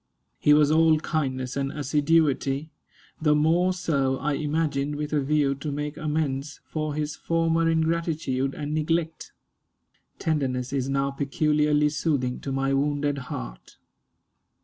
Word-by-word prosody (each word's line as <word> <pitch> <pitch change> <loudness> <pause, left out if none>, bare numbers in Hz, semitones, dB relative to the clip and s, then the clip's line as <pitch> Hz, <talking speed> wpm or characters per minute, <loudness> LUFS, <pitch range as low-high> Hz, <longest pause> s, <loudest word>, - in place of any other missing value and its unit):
He 150 - +3
was 150 0 +4
all 160 0 +5
kindness 130 -6 -2
and 140 0 -1
assiduity; 145 0 +1 0.5
the 150 -1 +4
more 165 +5 +3
so, 140 -7 0
I 150 +2 -1
imagined, 150 -1 -1
with 150 +1 -4
a 150 - +2
view 140 0 +2
to 140 +2 -5
make 145 +1 -4
amends 150 -2 -2
for 155 -2 -3
his 150 0 -2
former 165 0 +1
ingratitude 160 -5 0
and 150 0 -4
neglect. 160 +1 -1 0.9
Tenderness 130 -5 -1
is 135 -1 -1
now 140 0 0
peculiarly 150 +1 +1
soothing 145 -5 -1
to 135 - -5
my 135 0 0
wounded 145 0 0
heart. - - -7
150 Hz, 130 wpm, -25 LUFS, 140-155 Hz, 0.9 s, all